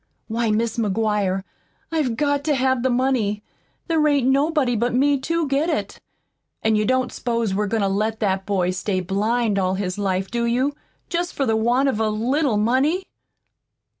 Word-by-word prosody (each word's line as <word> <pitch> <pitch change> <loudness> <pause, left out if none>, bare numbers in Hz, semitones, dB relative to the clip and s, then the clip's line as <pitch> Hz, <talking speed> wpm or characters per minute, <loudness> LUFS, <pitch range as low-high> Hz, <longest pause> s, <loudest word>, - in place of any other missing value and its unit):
Why, 230 0 -1
Mis' 225 +2 0
McGuire, 205 -3 0 0.5
I've 285 -8 0
got 285 -1 +1
to 300 -2 +2
have 260 -1 +1
the 260 - +1
money. 240 -5 0 0.4
There 320 -3 +2
ain't 280 -4 +2
nobody 275 -2 +2
but 240 +2 0
me 280 +2 +3
TO 330 +3 -1
get 280 +5 +1
it. 310 - -3 0.6
An' 220 0 +3
you 210 0 +1
don't 255 0 +1
s'pose 230 -4 -1
we're 210 +2 0
goin' 225 +1 0
to - - +2
let 215 +3 -1
that 190 -2 -1
boy 185 -3 +1
stay 185 +1 -2
blind 210 +3 0
all 185 0 +1
his 190 0 -3
life, 190 -1 -1
do 235 0 0
you, 255 +5 +1 0.4
jest 345 +1 -2
for 275 - 0
the 225 -3 +1
want 240 +5 +2
of 260 -5 0
a 220 -1 +1
little 240 +3 0
money?" 265 - +2
235 Hz, 180 wpm, -22 LUFS, 210-270 Hz, 0.6 s, me